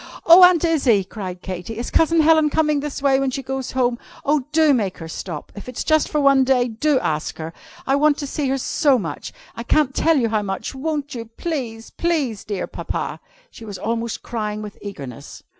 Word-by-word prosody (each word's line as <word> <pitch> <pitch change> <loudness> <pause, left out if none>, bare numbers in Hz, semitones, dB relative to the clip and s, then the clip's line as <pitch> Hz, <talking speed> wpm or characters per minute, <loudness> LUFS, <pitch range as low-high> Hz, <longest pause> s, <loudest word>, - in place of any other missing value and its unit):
"Oh, 340 +2 +9
Aunt 360 -2 +6
Izzie!" 270 -11 +3
cried 185 -2 -7
Katy, 185 +4 -6
"is 240 - -4
Cousin 325 0 +3
Helen 315 -1 +5
coming 305 -1 +1
this 285 -1 -5
way 270 -1 +4
when 275 -1 0
she 270 +1 -4
goes 265 0 -4
home? 245 -2 +1 0.3
Oh! 290 -2 +1
do 310 -1 +4
make 205 -8 -1
her 165 - -8
stop. 160 -1 -7
If 205 +4 -8
it's 250 - -4
just 310 -1 +2
for 300 - 0
one 275 -2 +5
day, 255 -2 +2
do 275 +6 +1
ask 155 -6 -2
her! 160 +1 -6 0.3
I 270 - +2
want 295 0 +3
to 290 - -4
see 285 0 -2
her 270 - +1
so 270 +1 +2
much! 165 -10 -5 0.2
I - - -5
can't 270 +2 +1
tell 325 +2 +3
you 235 -4 +1
how 215 -1 +1
much! 195 -1 -4
Won't 290 +1 -3
you? 230 -2 -5
Please! 245 -9 -4
Please, 295 -11 -1
dear 205 -3 -3
Papa!" - - -4 0.3
She - - -12
was 205 -3 -7
almost 230 +1 -3
crying 215 -2 -4
with 210 -1 -9
eagerness. 140 - -9
260 Hz, 210 wpm, -21 LUFS, 210-295 Hz, 0.3 s, Oh